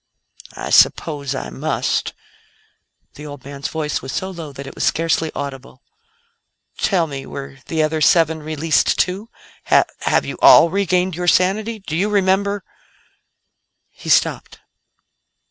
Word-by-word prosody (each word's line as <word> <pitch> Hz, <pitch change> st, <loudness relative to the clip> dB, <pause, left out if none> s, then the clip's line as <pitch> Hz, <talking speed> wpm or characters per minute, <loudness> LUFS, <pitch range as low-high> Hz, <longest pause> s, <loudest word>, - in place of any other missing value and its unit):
"I -, -, -6 dB
suppose 145 Hz, -4 st, +3 dB
I 65 Hz, -, -5 dB
must." 60 Hz, -, -2 dB, 1.0 s
The 150 Hz, +1 st, -10 dB
old 145 Hz, -3 st, -10 dB
man's 140 Hz, 0 st, -5 dB
voice 155 Hz, -2 st, -3 dB
was 135 Hz, -, -6 dB
so 190 Hz, 0 st, -3 dB
low 165 Hz, -5 st, -8 dB
that 140 Hz, 0 st, -9 dB
it -, -, -9 dB
was -, -, -4 dB
scarcely 165 Hz, -1 st, +1 dB
audible. 135 Hz, -1 st, -7 dB, 1.0 s
"Tell 185 Hz, -5 st, +2 dB
me 140 Hz, -3 st, -7 dB
were 135 Hz, -1 st, -8 dB
the 160 Hz, -1 st, 0 dB
other 155 Hz, 0 st, -1 dB
seven 160 Hz, 0 st, +3 dB
released, 155 Hz, +1 st, +1 dB
too? 195 Hz, +5 st, -1 dB, 0.4 s
Have -, -, +4 dB
have -, -, +1 dB
you -, -, -6 dB
all 170 Hz, -, +8 dB
regained 185 Hz, -1 st, +1 dB
your 180 Hz, +1 st, -3 dB
sanity? 205 Hz, +6 st, +2 dB
Do 190 Hz, -6 st, -6 dB
you 195 Hz, +5 st, +1 dB
remember 200 Hz, 0 st, +1 dB, 0.7 s
" -, -, -53 dB
He -, -, -6 dB
stopped. -, -, +1 dB
160 Hz, 145 wpm, -19 LUFS, 140-185 Hz, 1.0 s, all